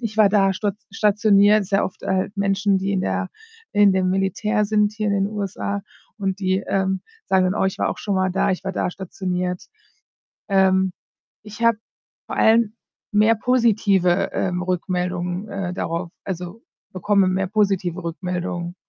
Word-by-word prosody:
„Ich 220 -1 -4
war 210 -2 +7
da 195 -1 +3
stat 200 +1 -2
stationiert.“ 210 0 +4
Ist 195 - -11
ja 195 - +3
oft, 185 - -7
halt, 190 +2 -1
Menschen, 200 0 +1
die 195 +1 -1
in 190 - 0
der - - -2 0.4
in 205 -1 +5
dem 185 -1 +1
Militär 210 +3 0
sind, 210 0 +2
hier 215 -1 -3
in 200 - +1
den 195 0 +1
USA 200 -1 -3 0.4
und 195 -1 -2
die, 190 -1 +1
ähm, 190 -1 0 0.2
sagen 190 -1 +2
dann: - - -1
„Oh, 210 - +1
ich 190 - -1
war - - +1
auch - - -3
schonmal 190 -2 0
da. 190 - +1
Ich 185 - -2
war 195 - -3
da 180 - -1
stationiert.“ 180 -1 -4 0.8
Ähm, 190 -1 +3 0.5
ich 215 +2 -10
habe 230 -2 +4 0.5
vor - - -6
allem 225 -1 +4 0.4
mehr 215 +2 +4
positive, 210 -6 +2
ähm, 180 -1 -1
Rückmeldungen, 180 +1 -2
äh, 195 -3 -4
darauf 170 -1 -3
also, 180 +3 -6 0.3
bekomme 195 +1 +2
mehr 190 +1 0
positive 190 -3 0
Rückmeldungen. 175 0 -4
195 Hz, 165 wpm, -22 LUFS, 185-205 Hz, 0.8 s, war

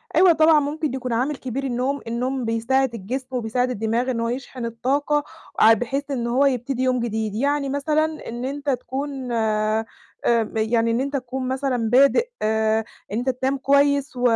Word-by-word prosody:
أيوه 365 -2 +7
طبعًا، 315 -1 +5
ممكن 295 0 -2
يكون 255 -2 -3
عامل 260 +6 0
كبير 260 +1 -4
النوم، 265 +2 -1
النوم 250 +2 -2
بيساعد 235 +3 +1
الجسم 245 +6 -4
وبيساعد 250 0 -1
الدماغ 235 +2 -1
إن 235 - -2
هو 230 0 -1
يشحن 250 0 -5
الطاقة 280 +6 0 0.4
آآ 225 - +8
بحيث 275 +6 -2
إن 240 -3 -1
هو 255 +4 +3
يبتدي 260 -1 0
يوم 255 -1 +2
جديد، 220 -3 -2
يعني 280 +3 0
مثلًا 310 +3 -1
إن 240 +2 -5
أنت 285 +2 -3
تكون 265 0 -3
آآ 220 -1 +1 0.7
يعني 225 +1 +1
إن 230 - +1
أنت 280 +2 -3
تكون 255 0 -4
مثلًا 260 -3 -1
بادئ 275 - +4
آآ 220 0 +2 0.3
إن 210 - -1
أنت 250 +3 -1
تنام 260 +2 0
كويس 280 +1 +2
و 245 - -5
255 Hz, 170 wpm, -23 LUFS, 230-275 Hz, 0.7 s, آآ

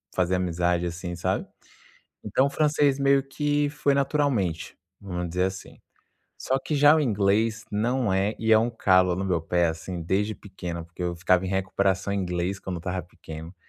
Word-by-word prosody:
fazer 90 0 +1
amizade, 90 -1 0
assim, 90 +1 -5
sabe. 85 - -2 0.8
Então, 130 - +2
o - - 0
francês 145 -2 +2
meio 140 0 +3
que 145 +1 0
foi 150 -2 +1
naturalmente, 135 - 0 0.2
vamos 90 -3 -4
dizer 90 +2 0
assim. 95 0 -6 0.6
Só 130 - 0
que, 150 +3 -4
já 145 +2 +6
o - - +2
inglês, 110 -2 +1
não 115 +2 0
é, 95 +3 +1
e 110 0 -1
é 110 - +8
um 115 +2 +1
calo 95 -5 +3
no 95 - -3
meu 90 -4 0
pé 85 +1 +1
assim, 85 +2 -5
desde 105 +5 0
pequeno, 90 -4 -7
porque 85 +2 -9
eu 85 0 -1
ficava 90 +1 +2
em - - -2
recuperação 95 0 0
em 100 - 0
inglês 90 +1 -2
quando 95 -2 -5
eu - - -4
estava 90 +2 -3
pequeno, 80 -1 -10
95 Hz, 185 wpm, -26 LUFS, 90-120 Hz, 0.8 s, é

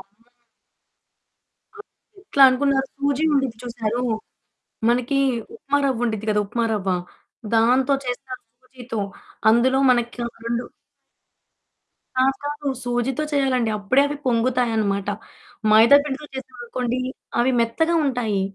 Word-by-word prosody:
అమ్మో! 205 +5 -22 1.5
అది 415 -1 -19
ఎట్లా 280 -8 +2
అనుకున్నారు, 270 +1 +1
సూజీ 280 +1 0
ఉండిద్ది 270 -5 0
చూశారు, 235 0 -2 0.9
మనకి 250 +3 +1 0.4
ఉప్మా 285 -9 -1
రవ్వుండిద్ది 230 -4 -1
గదా! 210 0 +2
ఉప్మా 235 +2 -1
రవ్వ, 195 -2 -2 0.7
దాంతో 255 +5 +3
చేస్తారు 255 +1 -5 0.2
సూజీతో. 250 -3 -7 0.5
అందులో 260 +3 +3
మనకా 240 0 -1 0.2
2 235 +1 -1 1.5
కాదు 265 +1 +3
కాదు. 295 0 -5 0.2
సూజీతో 245 +3 -1
చేయాలండి. 260 -5 +1
అప్పుడే 230 +7 +3
అవి 290 +1 -4
పొంగుతాయనమాట. 230 -5 +1 0.6
మైదా 225 +6 +8
పిండితో 295 +1 -5
చేశామనుకోండి, 250 -1 -4 0.4
అవి 245 +2 +3
మెత్తగా 280 +9 +1
ఉంటాయి. 240 -7 0
245 Hz, 105 wpm, -22 LUFS, 230-270 Hz, 1.5 s, మైదా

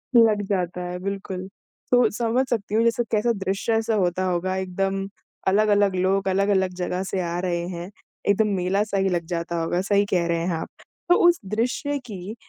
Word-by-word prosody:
लग 225 -3 +6
जाता 180 -2 -1
है 180 0 -5
बिल्कुल, 190 -1 -4 0.4
तो 245 -2 +5
समझ 235 +4 +1
सकती 210 -3 -1
हूँ 225 - +4
जैसे 235 +1 +2
कैसा 225 +2 +2
दृश्य 195 +4 -1
ऐसा 225 0 +1
होता 185 -2 +1
होगा 185 +1 0
एकदम, 195 +1 -2 0.4
अलग-अलग 205 0 +3
लोग 190 +2 +1
अलग-अलग 190 -1 +2
जगह 180 +1 -2
से 190 0 -3
आ 170 0 -2
रहे 175 -1 -1
हैं, 175 0 -6 0.4
एकदम 210 +2 +3
मेला-सा 195 +3 0
ही 195 0 +2
लग 175 -2 -1
जाता 170 0 -2
होगा, 175 +2 0
सही 200 +1 +2
कह 175 -2 +2
रहे 170 0 +1
हैं 175 -2 0
आप। 160 - -5 0.4
तो 355 - +7
उस 345 -1 +4
दृश्य 245 +8 -1
की, 200 -1 -7
195 Hz, 185 wpm, -24 LUFS, 180-215 Hz, 0.4 s, तो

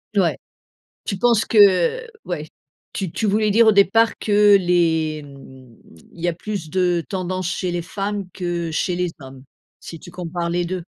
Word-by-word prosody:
Ouais. 170 -8 +2 0.7
Tu 195 - -3
penses 230 +1 +2
que 205 - +4 0.2
ouais. 155 -4 -4 0.5
Tu 190 -4 -4
tu 220 - -2
voulais 210 +1 +2
dire 225 +2 +5
au 220 - +7
départ 210 +3 +3
que 205 -1 +5
les 165 -4 +1
mmh, 130 -4 -15 0.4
il 170 - -16
y 175 - -1
a 175 - +1
plus 180 -2 -6
de 180 -3 +1
tendance 185 -2 -3
chez 180 -1 -2
les 175 - -2
femmes 200 +3 -4
que 175 -2 -3
chez 175 +3 -1
les 180 -1 -2
hommes, 130 -1 -12 0.4
si 165 - -10
tu - - -12
compares 175 -1 -4
les 175 +1 -1
2? 180 0 -4
180 Hz, 175 wpm, -21 LUFS, 165-200 Hz, 0.7 s, au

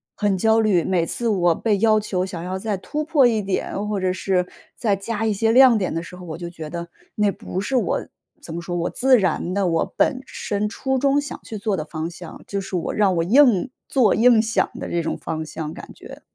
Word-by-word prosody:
很 205 -2 +1
焦 220 +3 +3
虑， 195 -6 +2
每 175 -3 +1
次 235 +7 -2
我 175 -6 +2
被 215 -3 +1
要 215 -1 +4
求 185 -3 -2
想 175 -3 -6
要 185 +1 -3
再 210 +1 -2
突 295 +11 -4
破 300 -4 +4
一 220 -3 +1
点， 200 +1 -3
或 210 -2 -1
者 185 0 0
是 185 -1 0 0.3
再 210 -4 +1
加 215 +3 -3
一 220 - +1
些 225 +3 +1
亮 255 -1 +7
点 185 -5 -1
的 165 - -2
时 175 - -10
候， 180 0 -10
我 160 -1 -6
就 175 0 -6
觉 160 -3 -8
得 170 +1 -5 0.3
那 210 -1 +2
不 185 - -5
是 265 +6 -2
我 250 - 0 0.3
怎 160 - -8
么 170 - -4
说， 175 +1 -5
我 170 0 -1
自 260 -1 +4
然 180 -1 -1
的， 195 -2 +1
我 165 -1 0
本 255 - +2
身 210 -4 -3
初 265 +4 -2
衷 280 +1 +3
想 290 - -7
去 220 - -7
做 205 -2 -1
的 155 - -3
方 160 +1 -4
向， 175 0 -10
就 200 - -2
是 195 -1 -6
我 175 - -2
让 200 -3 +2
我 165 - +2
硬 245 +1 +4 0.2
做、 250 -7 +3
硬 230 0 +5
想 225 +1 0
的 - - -5
这 170 -1 -1
种 - - -2
方 160 0 -4
向， 155 0 -6
感 - - -10
觉。 - - -12
200 Hz, 255 characters per minute, -22 LUFS, 175-225 Hz, 0.3 s, 亮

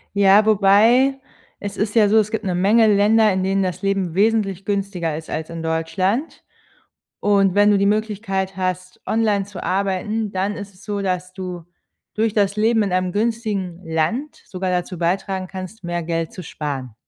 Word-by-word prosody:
Ja, 200 +1 +5
wobei 220 +6 +4 0.4
es 205 -1 -6
ist 210 +1 -2
ja 215 -3 +5
so, 220 - +4
es 215 -1 +2
gibt 220 - -2
'ne 185 -2 -1
Menge 215 +5 +4
Länder, 210 +1 +4
in 185 0 -1
denen 195 +1 +1
das 185 -1 -3
Leben 195 -4 -1
wesentlich 200 -2 +1
günstiger 195 -6 -2
ist 160 - -9
als 160 0 -4
in 165 0 -6
Deutschland. 165 - -1 0.8
Und 195 -2 +3
wenn 205 +1 +5
du 205 - +4
die 200 - +2
Möglichkeit 200 -2 -1
hast, 185 0 -3
online 215 -3 +1
zu 200 -2 -9
arbeiten, 200 +3 -1
dann 195 +2 -1
ist 200 -1 -8
es 185 - -18
so, 205 -1 -3
dass 185 -1 -2
du 180 -2 -7 0.5
durch 220 0 0
das 200 -1 +1
Leben 220 +1 +3
in 200 -3 -2
einem 185 0 0
günstigen 210 -5 -2
Land 165 - -1
sogar 185 -1 -3
dazu 180 0 -2
beitragen 185 +2 -1
kannst, 190 +3 -9
mehr 175 0 -2
Geld 165 0 -3
zu 185 - -8
sparen. 140 -7 -5
195 Hz, 180 wpm, -21 LUFS, 185-210 Hz, 0.8 s, Ja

